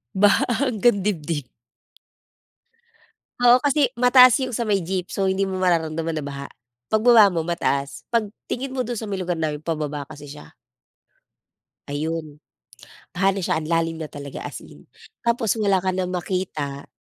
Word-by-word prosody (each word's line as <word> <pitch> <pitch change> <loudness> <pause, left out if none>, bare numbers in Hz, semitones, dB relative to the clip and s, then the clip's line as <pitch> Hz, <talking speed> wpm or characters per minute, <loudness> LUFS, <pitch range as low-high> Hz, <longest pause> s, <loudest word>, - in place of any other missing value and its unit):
Baha 200 +1 +4 0.2
hanggang 225 -5 +2
dibdib. 160 -8 -2 1.9
Oo, 245 +1 +6
kasi 290 0 +3
mataas 250 0 +7
yung 255 - -1
sa 235 -1 -2
may 200 -3 +1
jeep. 180 +1 -4
So, 195 -1 +1
hindi 195 +1 +1
mo 190 -1 -4
mararamdaman 165 -2 0
na 145 - -4
baha. 140 0 -6 0.4
Pagbaba 220 -1 +6
mo 165 -3 -2
mataas, 140 -5 -1
'pag 230 -2 +1 0.2
tingin 260 +1 -3
mo 260 - -1
do'n 240 -1 -4
sa 220 - -4
may 195 -2 -4
lugar 175 -2 -2
namin, 155 -2 -2
pababa 150 -3 -3
kasi 150 -1 -10
siya. 145 +1 -12 1.3
Ayun. 155 +1 -4 0.7
Baha 195 +2 +1
na - - -2
siya, 160 - 0
ang 155 - -7
lalim 165 -1 0
na 155 - -5
talaga 140 -1 -8
as - - -9
in. - - -16 0.3
Tapos 235 -3 +1
wala 200 -2 +3
ka 185 - +1
nang 185 -1 -2
makita. 175 -6 -4
180 Hz, 160 wpm, -23 LUFS, 155-215 Hz, 1.9 s, mataas